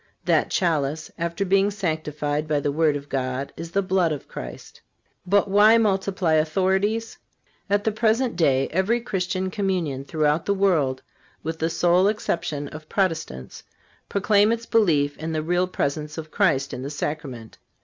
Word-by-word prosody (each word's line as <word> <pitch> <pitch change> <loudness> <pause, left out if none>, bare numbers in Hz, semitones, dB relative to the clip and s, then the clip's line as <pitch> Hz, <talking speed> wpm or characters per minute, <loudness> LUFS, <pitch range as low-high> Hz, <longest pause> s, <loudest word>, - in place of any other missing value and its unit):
That - - +2
chalice, 155 -4 0
after 170 +3 -1
being 195 +1 +3
sanctified 155 -6 -2
by 150 -1 +1
the 145 0 -1
word 155 0 +2
of 145 0 -6
God, 130 0 -3
is 165 0 -7
the 195 +3 0
blood 185 -3 +1
of 150 - -5
Christ."(376) - - -11 0.2
But 200 +2 +3
why 210 +3 +6
multiply 195 -5 +1
authorities? 190 +8 +1 0.5
At 205 0 +2
the 220 - +1
present 230 +3 +1
day 135 -6 +2
every 190 +7 +1
Christian 185 -4 -2
communion 180 -9 -1
throughout 150 +1 0
the 200 - +2
world, 155 -10 +1 0.4
with 160 +1 -4
the 160 - 0
sole 175 +3 +3
exception 160 -8 -2
of 155 0 -11
Protestants, 165 - -2 0.5
proclaim 205 +1 +3
its 230 0 -2
belief 155 -12 +2
in 160 +1 -4
the 155 -1 -1
Real 175 +3 +1
Presence 150 -2 -3
of 155 -1 -7
Christ 150 -10 +1
in 125 - -5
the 135 - -4
Sacrament. 145 -6 -5
165 Hz, 160 wpm, -24 LUFS, 150-195 Hz, 0.5 s, why